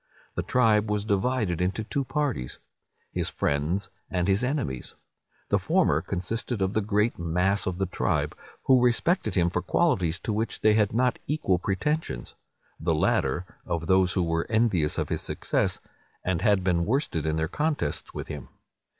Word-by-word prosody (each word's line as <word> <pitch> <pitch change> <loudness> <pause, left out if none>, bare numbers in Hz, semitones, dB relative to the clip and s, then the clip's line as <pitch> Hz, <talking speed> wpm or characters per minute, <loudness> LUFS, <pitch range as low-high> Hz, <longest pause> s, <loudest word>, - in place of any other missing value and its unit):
The - - -1
tribe 110 -4 +3
was 105 0 0
divided 105 -4 0
into 95 +4 0
two 140 +5 -2
parties, 135 - -2 0.5
his - - -1
friends 80 +8 -1 0.2
and 90 -1 0
his 100 +4 +2
enemies. 125 - -2 0.5
The - - +3
former - - +2
consisted 115 +5 -3
of 95 +1 0
the 110 - +2
great 105 +1 +1
mass 90 +5 +1
of 90 -2 -2
the 95 - 0
tribe, 90 - -1 0.3
who 130 -2 +5
respected 145 +10 +2
him 85 -2 +3
for 90 - 0
qualities 90 - +1
to 110 - -2
which 110 +2 -2
they 110 - +5
had 105 -2 +3
not 125 +3 +1
equal 120 - +1
pretensions; 95 - -2 0.5
the 80 0 +1
latter, 75 +2 +1 0.2
of 85 -1 -3
those 95 0 +3
who 90 - +1
were 80 0 -1
envious 105 -9 +2
of - - -1
his - - -1
success, - - -1 0.5
and 90 -2 0
had 100 -3 +3
been 90 -2 +2
worsted 110 - 0
in 80 - +1
their 80 0 0
contests 150 - -1
with - - -5
him. - - -7
95 Hz, 165 wpm, -27 LUFS, 85-115 Hz, 0.5 s, who